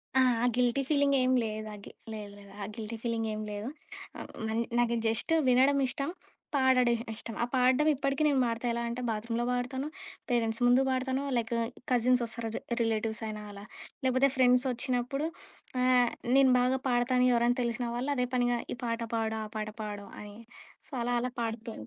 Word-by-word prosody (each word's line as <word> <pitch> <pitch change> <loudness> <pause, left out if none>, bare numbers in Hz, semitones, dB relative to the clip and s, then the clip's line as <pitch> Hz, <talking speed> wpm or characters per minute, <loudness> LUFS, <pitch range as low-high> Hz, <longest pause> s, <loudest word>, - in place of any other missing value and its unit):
ఆ! 265 - +6 0.4
గిల్టీ 250 +2 +2
ఫీలింగేం 280 -3 +3
లేదు. 215 0 -4
ఆ - - -7
గి - - -10 0.2
లేదు, 210 -2 -7
లేదు. 200 -1 -14
ఆ - - -2
గిల్టీ 225 0 -5
ఫీలింగేం 225 -2 -2
లేదు. 205 +4 -4 0.5
ఆహ్, - - -8
హ్మ్. 225 - -5
మన్ 225 +1 0 0.2
నాకు 235 -1 +2
జస్టు 235 +9 +1
వినడం 265 +3 +4
ఇష్టం. 275 +3 -2 0.5
పాడడం 255 -3 +4 0.2
ఇష్టం. 225 +1 -7
ఆ - - +2
పాడడం 260 +4 +4
ఇప్పటికి 275 +2 0
నేను 280 -3 +3
పాడతా. 230 +1 -2
ఎలా 235 - -2
అంటే, 235 +2 -4
బాత్‌రూమ్‌లో 230 +2 -2
పాడతాను, 255 +3 -2 0.4
పేరెంట్స్ 230 -1 0
ముందు 245 +2 +5
పాడతాను, 260 +1 0
లైకు 230 0 -1 0.3
కజిన్సొస్తారు, 235 -2 +1
రి - - -3 0.2
రిలేటివ్స్ 225 0 0
అయినా, 215 -1 -5
అలా 200 0 -10 0.4
లేకపోతే 260 +2 +4
ఫ్రెండ్సొచ్చినప్పుడు, 250 +2 +2 0.5
ఆహ్, 250 -1 +4 0.3
నేను 270 -1 +6
బాగా 255 +1 +2
పాడతాను 250 +1 +3
ఎవరైనా 240 +1 +2
తెలిసిన 235 0 -2
వాళ్ళు, 260 +4 -1
అదే 250 -1 0
పనిగా 245 -1 +2 0.2
ఈ - - -21
పాట 230 0 -2
పాడు, 220 -1 -1
ఆ - - -5
పాట 215 0 -3
పాడు 205 -1 -6
అని 205 0 -10 0.5
సో, - - -20
అలా, 245 +1 0
అలా 250 +1 -2
పాడుతు 225 0 -4
245 Hz, 165 wpm, -30 LUFS, 225-255 Hz, 0.5 s, ఆ